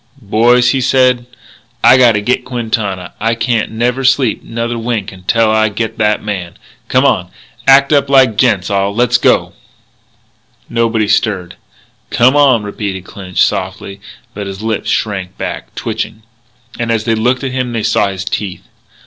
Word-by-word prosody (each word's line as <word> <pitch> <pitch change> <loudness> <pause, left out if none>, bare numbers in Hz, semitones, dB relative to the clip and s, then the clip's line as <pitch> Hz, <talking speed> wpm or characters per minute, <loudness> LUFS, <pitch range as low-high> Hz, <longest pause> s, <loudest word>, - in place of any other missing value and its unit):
"Boys," 120 +3 +3
he 135 - 0
said, 125 -1 +2 0.6
"I - - +7
gotta 120 -5 +4
get 125 +5 0
Quintana. 110 -7 -3
I 115 +2 0
can't 115 -1 -1
never 120 +4 -1
sleep 130 -3 +2
another 115 +1 -4
wink 115 -4 -3
till 115 -1 +3
I 110 0 +2
get 110 +2 -4
that 105 0 +1
man. 95 -5 -5 0.3
Come - - +2
on. - - +1 0.4
Act 140 +2 +6
up 140 -1 +2
like 130 -5 +4
gents 100 -6 +1
all. 100 0 0
Let's 120 +1 +2
go." - - +2 1.1
Nobody 115 -2 0
stirred. 100 -4 0 0.5
"Come 125 +4 +3
on," 135 -6 +4
repeated 100 -2 -5
Clinch 90 -1 -2
softly. 95 +1 -3 0.3
But 100 -1 -6
his 100 +2 -7
lips 110 -1 -2
shrank 95 -4 -2
back, - - -6
twitching. 110 - -4 0.6
As 115 -2 0
they 115 0 0
looked 125 +4 0
at 135 - -2
him 125 -1 -2
they 115 -2 -3
saw 105 - +2
his 95 -1 -5
teeth. 100 -3 -4
115 Hz, 155 wpm, -14 LUFS, 100-125 Hz, 1.1 s, I